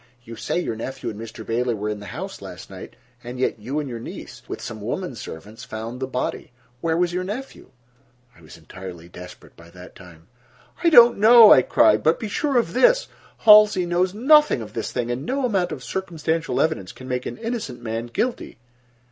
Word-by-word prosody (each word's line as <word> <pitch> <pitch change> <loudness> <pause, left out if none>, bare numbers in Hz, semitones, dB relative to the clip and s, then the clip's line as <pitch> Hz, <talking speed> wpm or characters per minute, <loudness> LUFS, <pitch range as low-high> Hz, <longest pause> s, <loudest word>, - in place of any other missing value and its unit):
"You 115 0 -10
say 175 - -2
your 145 -10 -3
nephew 130 +1 -5
and 105 +1 -9
Mr. 115 -1 -9
Bailey 120 +1 -1
were 105 0 -4
in 105 -1 -3
the 100 - -10
house - - -7
last - - -10
night, - - -10 0.3
and 120 +1 -8
yet 130 - -1
you 130 +8 -3
and 150 - -4
your 120 -3 -6
niece, - - -10
with - - -6
some 110 -4 -8
women 135 - -4
servants, 110 +2 -10
found 115 0 -7
the 130 - -3
body. 125 -1 -4 0.3
Where 165 +3 -1
was 175 0 0
your 180 +1 -2
nephew?" 225 +8 -7 0.7
I 85 - -20
was 80 0 -14
entirely 85 +1 -11
desperate 90 0 -13
by 85 0 -16
that 90 +1 -13
time. 85 -3 -16 0.6
"I 340 - +5
do 270 -7 +10
not 240 - -4
know," 225 +1 +9
I 130 - +6
cried, 105 -3 +3
"but 160 +6 +2
be 220 - -4
sure 280 +4 0
of 235 - 0
this: - - +3 0.4
Halsey 210 -4 +7
knows 175 +1 0
nothing 285 - +4
of 105 - -12
this 115 - -4
thing, 120 -1 -3
and 125 +3 -4
no 265 - -1
amount 195 -7 0
of - - -7
circumstantial 165 -3 -3
evidence 155 - -1
can 130 - -12
make 125 -1 -3
an - - -6
innocent 225 - -5
man 115 +1 -4
guilty." 235 - -3
130 Hz, 205 wpm, -22 LUFS, -, 0.7 s, do